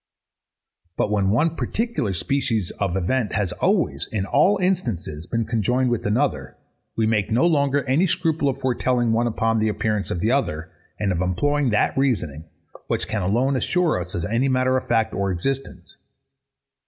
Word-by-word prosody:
But 105 Hz, -, 0 dB
when 100 Hz, -2 st, +2 dB
one 150 Hz, +10 st, +2 dB
particular 185 Hz, -, -2 dB
species 110 Hz, +2 st, -1 dB
of 95 Hz, -2 st, 0 dB
event 105 Hz, +3 st, 0 dB
has 100 Hz, -4 st, 0 dB
always, -, -, 0 dB
in 100 Hz, -3 st, -1 dB
all 155 Hz, -, +3 dB
instances, 115 Hz, -, -2 dB
been 115 Hz, -1 st, -1 dB
conjoined 120 Hz, +3 st, +1 dB
with 120 Hz, -3 st, -1 dB
another, 105 Hz, -, -1 dB, 0.4 s
we 110 Hz, -, +1 dB
make 110 Hz, -2 st, +1 dB
no 120 Hz, +8 st, +3 dB
longer 140 Hz, -4 st, +2 dB
any 140 Hz, +9 st, +2 dB
scruple 165 Hz, -5 st, 0 dB
of 130 Hz, -, -2 dB
foretelling 125 Hz, -2 st, 0 dB
one 120 Hz, +1 st, +2 dB
upon 115 Hz, 0 st, 0 dB
the 110 Hz, 0 st, +1 dB
appearance 105 Hz, -1 st, -1 dB
of 85 Hz, -, -2 dB
the 110 Hz, +6 st, +1 dB
other, 85 Hz, -, -1 dB, 0.3 s
and 100 Hz, -2 st, 0 dB
of 90 Hz, -1 st, -1 dB
employing 140 Hz, +10 st, +1 dB
that 105 Hz, -, +1 dB
reasoning, 90 Hz, -, -1 dB, 0.4 s
which -, -, -2 dB
can 110 Hz, -, -2 dB
alone 120 Hz, +9 st, +1 dB
assure 165 Hz, -, +1 dB
us 90 Hz, +1 st, -6 dB
of 85 Hz, -, -2 dB
any 115 Hz, +6 st, +1 dB
matter 130 Hz, 0 st, +2 dB
of 130 Hz, 0 st, -2 dB
fact 115 Hz, -2 st, +1 dB
or 100 Hz, 0 st, -1 dB
existence. 135 Hz, +10 st, -4 dB
115 Hz, 170 wpm, -23 LUFS, 100-135 Hz, 0.4 s, all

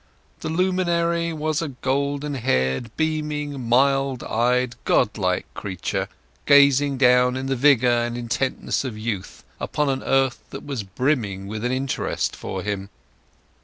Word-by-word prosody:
The 160 Hz, -, -4 dB
luminary 170 Hz, -1 st, +1 dB
was 155 Hz, -1 st, -1 dB
a 165 Hz, -, -2 dB
golden 140 Hz, +2 st, -2 dB
haired, 65 Hz, -, 0 dB
beaming, 150 Hz, -5 st, -2 dB
mild 135 Hz, +1 st, +2 dB
eyed, 125 Hz, +2 st, +1 dB
God -, -, +2 dB
like -, -, 0 dB
creature, 95 Hz, -4 st, -3 dB, 0.4 s
gazing 140 Hz, -1 st, +5 dB
down 125 Hz, 0 st, +4 dB
in 130 Hz, -, -4 dB
the 135 Hz, 0 st, 0 dB
vigour 125 Hz, -3 st, +4 dB
and 120 Hz, 0 st, -3 dB
intentness 120 Hz, +4 st, -1 dB
of 125 Hz, -5 st, -5 dB
youth 110 Hz, -4 st, -5 dB, 0.2 s
upon 150 Hz, -1 st, -1 dB
an 135 Hz, -1 st, -1 dB
earth 135 Hz, -1 st, +1 dB
that 135 Hz, -, -8 dB
was 140 Hz, -5 st, -3 dB
brimming 100 Hz, -2 st, -1 dB
with 110 Hz, +2 st, -5 dB
interest 130 Hz, +2 st, -1 dB
for 95 Hz, -1 st, -5 dB
him. 100 Hz, -1 st, -3 dB
135 Hz, 135 wpm, -23 LUFS, 120-145 Hz, 0.4 s, gazing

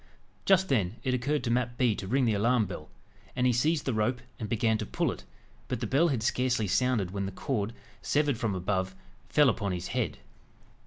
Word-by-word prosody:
Just 190 Hz, -1 st, +5 dB
then, 105 Hz, -, +1 dB
it 130 Hz, -, 0 dB
occurred 125 Hz, +3 st, 0 dB
to 120 Hz, -, 0 dB
Mat 120 Hz, 0 st, 0 dB
Bee 120 Hz, -4 st, +3 dB
to 95 Hz, -, -6 dB
ring 130 Hz, +5 st, +2 dB
the 115 Hz, -, +2 dB
alarm 115 Hz, +2 st, +2 dB
bell, 85 Hz, -4 st, -8 dB, 0.5 s
and 125 Hz, -1 st, +1 dB
he 125 Hz, -, +4 dB
seized 150 Hz, +5 st, +1 dB
the 130 Hz, -, 0 dB
rope, 110 Hz, +3 st, +1 dB, 0.2 s
and 110 Hz, -3 st, -4 dB
began 110 Hz, -1 st, +1 dB
to 110 Hz, -, -2 dB
pull -, -, 0 dB
it; -, -, -9 dB, 0.4 s
but 125 Hz, -, -2 dB
the 120 Hz, -, -2 dB
bell 140 Hz, +9 st, +3 dB
had 130 Hz, -8 st, -1 dB
scarcely 125 Hz, -1 st, +1 dB
sounded, 115 Hz, -3 st, +1 dB
when 100 Hz, 0 st, -2 dB
the -, -, -5 dB
cord, 105 Hz, +1 st, -2 dB, 0.3 s
severed 145 Hz, -5 st, +1 dB
from 110 Hz, -4 st, 0 dB
above, 95 Hz, 0 st, -1 dB, 0.3 s
fell 150 Hz, -2 st, +5 dB
upon 100 Hz, -5 st, 0 dB
his 90 Hz, -, -4 dB
head. -, -, -1 dB
120 Hz, 210 wpm, -29 LUFS, 100-130 Hz, 0.5 s, Just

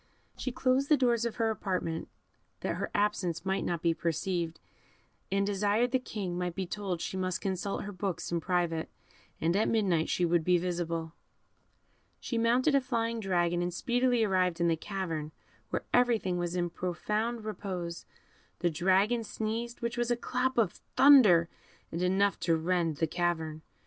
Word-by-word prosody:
She 255 Hz, -, -3 dB
closed 260 Hz, +2 st, +1 dB
the 300 Hz, -, +6 dB
doors 235 Hz, -3 st, +2 dB
of 235 Hz, -, -2 dB
her 225 Hz, -1 st, +1 dB
apartment, 185 Hz, -6 st, -2 dB, 0.5 s
that -, -, -2 dB
her -, -, -3 dB
absence 195 Hz, -5 st, 0 dB
might 190 Hz, +1 st, 0 dB
not 170 Hz, -2 st, -2 dB
be 170 Hz, -1 st, +3 dB
perceived, 165 Hz, +1 st, -2 dB, 0.7 s
and 200 Hz, 0 st, +2 dB
desired 205 Hz, +4 st, +1 dB
the 260 Hz, -, +2 dB
King 195 Hz, -7 st, -4 dB
might 180 Hz, -1 st, -2 dB
be 190 Hz, -, -2 dB
told 185 Hz, -2 st, -3 dB
she -, -, -4 dB
must 185 Hz, -1 st, -1 dB
consult 195 Hz, +1 st, -2 dB
her 205 Hz, -, -6 dB
books 185 Hz, -3 st, -3 dB
in 170 Hz, -, +1 dB
private, 170 Hz, -2 st, 0 dB, 0.5 s
and 170 Hz, +2 st, +1 dB
at 210 Hz, -, +2 dB
midnight 185 Hz, -8 st, +1 dB
she 180 Hz, -, +1 dB
would 170 Hz, -1 st, +2 dB
be 180 Hz, +1 st, +4 dB
visible. 170 Hz, -2 st, -2 dB, 1.1 s
She 235 Hz, -, -2 dB
mounted 245 Hz, +6 st, +3 dB
a 275 Hz, -, +4 dB
flying 230 Hz, -3 st, -1 dB
dragon, 175 Hz, -4 st, +1 dB
and 175 Hz, 0 st, -1 dB
speedily 245 Hz, +4 st, +1 dB
arrived 185 Hz, -4 st, +1 dB
in 170 Hz, 0 st, +3 dB
the 165 Hz, -, +3 dB
cavern, 160 Hz, -4 st, -4 dB, 0.4 s
where -, -, -3 dB
everything 230 Hz, -7 st, +2 dB
was 175 Hz, 0 st, -2 dB
in 175 Hz, -1 st, -1 dB
profound 215 Hz, +6 st, -2 dB
repose; 185 Hz, -5 st, -5 dB, 0.5 s
the 175 Hz, 0 st, 0 dB
dragon 190 Hz, +8 st, +2 dB
sneezed, 225 Hz, +2 st, -4 dB
which 235 Hz, +1 st, -2 dB
was 240 Hz, 0 st, 0 dB
like 240 Hz, -, +2 dB
a -, -, -26 dB
clap 255 Hz, +1 st, 0 dB
of 215 Hz, -7 st, +1 dB, 0.2 s
thunder, 225 Hz, -12 st, +7 dB, 0.4 s
and 170 Hz, -, -3 dB
enough 195 Hz, +2 st, +2 dB
to 165 Hz, -1 st, +2 dB
rend 165 Hz, -2 st, 0 dB
the 165 Hz, -, +2 dB
cavern. 160 Hz, -2 st, -2 dB
190 Hz, 170 wpm, -30 LUFS, 170-230 Hz, 1.1 s, thunder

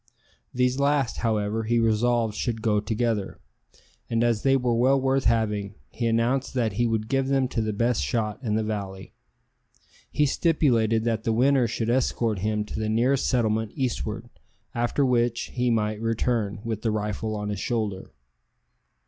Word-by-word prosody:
These 125 Hz, +1 st, +1 dB
last, 140 Hz, -3 st, +1 dB
however, 110 Hz, -1 st, -1 dB
he 120 Hz, +2 st, +1 dB
resolved 115 Hz, 0 st, +2 dB
should 115 Hz, 0 st, -3 dB
go 105 Hz, -2 st, +2 dB
together; 110 Hz, -1 st, -2 dB, 0.7 s
and 115 Hz, 0 st, +1 dB
as 115 Hz, -3 st, +1 dB
they 135 Hz, 0 st, +3 dB
were 125 Hz, -2 st, 0 dB
well 130 Hz, +4 st, +3 dB
worth 135 Hz, 0 st, +1 dB
having, 105 Hz, -3 st, 0 dB, 0.2 s
he 115 Hz, 0 st, -2 dB
announced 120 Hz, +4 st, 0 dB
that 115 Hz, -5 st, 0 dB
he 120 Hz, +4 st, +1 dB
would 110 Hz, -1 st, -1 dB
give 135 Hz, +2 st, 0 dB
them 135 Hz, -1 st, +2 dB
to 115 Hz, -, -1 dB
the 110 Hz, 0 st, -1 dB
best 115 Hz, +3 st, 0 dB
shot 105 Hz, -3 st, -1 dB
in 110 Hz, -5 st, -1 dB
the 110 Hz, -, +1 dB
valley. 100 Hz, -3 st, -5 dB, 1.0 s
He 150 Hz, -, +2 dB
stipulated 120 Hz, -8 st, +2 dB
that 115 Hz, -1 st, -1 dB
the 115 Hz, -, 0 dB
winner 125 Hz, +2 st, +3 dB
should 115 Hz, +1 st, -2 dB
escort 120 Hz, -4 st, 0 dB
him 105 Hz, +1 st, -1 dB
to 105 Hz, -, -6 dB
the 110 Hz, 0 st, -1 dB
nearest 125 Hz, +5 st, +2 dB
settlement 110 Hz, -3 st, 0 dB
eastward, 115 Hz, -3 st, -3 dB, 0.5 s
after 120 Hz, +4 st, +1 dB
which 120 Hz, -2 st, 0 dB
he 125 Hz, 0 st, 0 dB
might 110 Hz, -2 st, 0 dB
return 115 Hz, -2 st, -1 dB
with 110 Hz, -2 st, -3 dB
the 115 Hz, -, 0 dB
rifle 110 Hz, +1 st, -2 dB
on 105 Hz, 0 st, -4 dB
his 105 Hz, -2 st, -3 dB
shoulder. 105 Hz, -4 st, -2 dB
115 Hz, 165 wpm, -25 LUFS, 110-125 Hz, 1.0 s, they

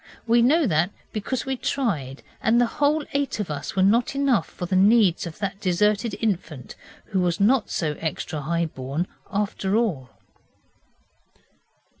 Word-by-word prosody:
We 235 Hz, +1 st, +4 dB
know 300 Hz, +7 st, +4 dB
that 170 Hz, -3 st, +2 dB, 0.2 s
because 230 Hz, +4 st, -3 dB
we 265 Hz, 0 st, -1 dB
tried, 165 Hz, -, -2 dB, 0.2 s
and 230 Hz, +2 st, +3 dB
the 245 Hz, -, +4 dB, 0.2 s
whole 295 Hz, +1 st, +3 dB
eight 280 Hz, -4 st, -1 dB
of 195 Hz, -7 st, -3 dB
us 145 Hz, +4 st, -5 dB
were 190 Hz, -, +3 dB
not 235 Hz, +7 st, +3 dB
enough 275 Hz, -5 st, +2 dB
for 180 Hz, -, -6 dB
the 185 Hz, -, -1 dB
needs 195 Hz, -3 st, +4 dB
of 160 Hz, -, -9 dB
that 200 Hz, -1 st, -4 dB
deserted 210 Hz, +3 st, +1 dB
infant 170 Hz, -, -3 dB, 0.4 s
who 195 Hz, -, +1 dB
was 175 Hz, -2 st, 0 dB
not 220 Hz, +3 st, +3 dB
so 155 Hz, -3 st, -1 dB
extra 155 Hz, -1 st, -4 dB
high 170 Hz, +3 st, 0 dB
born 140 Hz, +2 st, -3 dB, 0.3 s
after 200 Hz, -1 st, -1 dB
all. 180 Hz, -, 0 dB
200 Hz, 155 wpm, -24 LUFS, 170-235 Hz, 0.4 s, We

